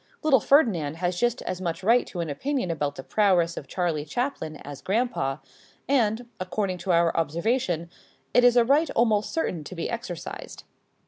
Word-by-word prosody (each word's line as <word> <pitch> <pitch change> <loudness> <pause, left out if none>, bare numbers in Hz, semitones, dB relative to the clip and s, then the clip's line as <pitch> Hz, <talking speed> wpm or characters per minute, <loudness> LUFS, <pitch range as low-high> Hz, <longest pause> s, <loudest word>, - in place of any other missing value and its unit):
Little 285 -4 +5
Ferdinand 205 - +3
has 175 +1 -2
just 240 +1 0
as 185 0 -4
much 170 0 -3
right 235 +5 +4
to 175 - -4
an 165 - -3
opinion 260 - -2
about 145 -3 -2
the 135 - -7
prowess 180 -4 +2
of 140 - -7
Charlie 165 -2 -1
Chaplin 200 - -3
as 145 -1 -8
grandpa, 200 - 0 0.5
and, 235 -3 +1
according 185 0 -2
to 180 +2 -1
our 170 -1 +3
observation, 170 - 0 0.5
it 245 - +5
is 245 0 +6
a 235 - +6
right 290 +6 +3
almost 215 -3 +2
certain 180 - -2
to 185 - -9
be 170 - -3
exercised. 225 -8 -6
185 Hz, 175 wpm, -26 LUFS, 165-240 Hz, 0.5 s, is